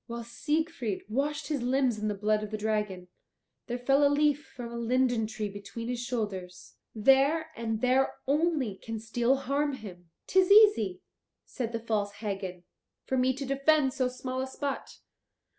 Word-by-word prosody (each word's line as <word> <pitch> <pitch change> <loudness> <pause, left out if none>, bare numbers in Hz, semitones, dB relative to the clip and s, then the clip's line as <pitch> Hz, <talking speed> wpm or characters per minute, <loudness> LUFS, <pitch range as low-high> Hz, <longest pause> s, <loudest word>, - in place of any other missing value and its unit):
While 235 0 -5
Siegfried 295 - -2
washed 285 +7 -1
his 290 -4 -1
limbs 250 -2 +1
in 215 - -2
the 210 - -1
blood 210 +1 +1
of 215 - -5
the 215 - -3
dragon, 210 -4 -2 0.6
there 245 -1 -2
fell 275 +3 +3
a 285 - +6
leaf 295 0 +2
from 240 -2 -6
a - - -6
linden 240 -1 +1
tree 215 -1 -4
between 205 +3 -7
his 245 -1 -2
shoulders. 205 -7 -4 0.2
There 275 +8 +3
and 225 -1 -3
there 260 +1 +2
only 290 - +1
can 225 +1 -6
steel 235 +4 +1
harm 280 +2 -1
him." 180 -8 -10 0.2
"'Tis 375 -1 +3
easy," 400 - +6 0.4
said 235 -3 -4
the 230 - -2
false 215 -3 -1
Hagen, 195 -4 -5 0.4
"for 265 - -1
me 255 0 +3
to 275 +1 -5
defend 275 0 +2
so 260 -2 +1
small 255 +1 -4
a 265 - -3
spot. 275 +1 -4
245 Hz, 170 wpm, -29 LUFS, 215-275 Hz, 0.6 s, a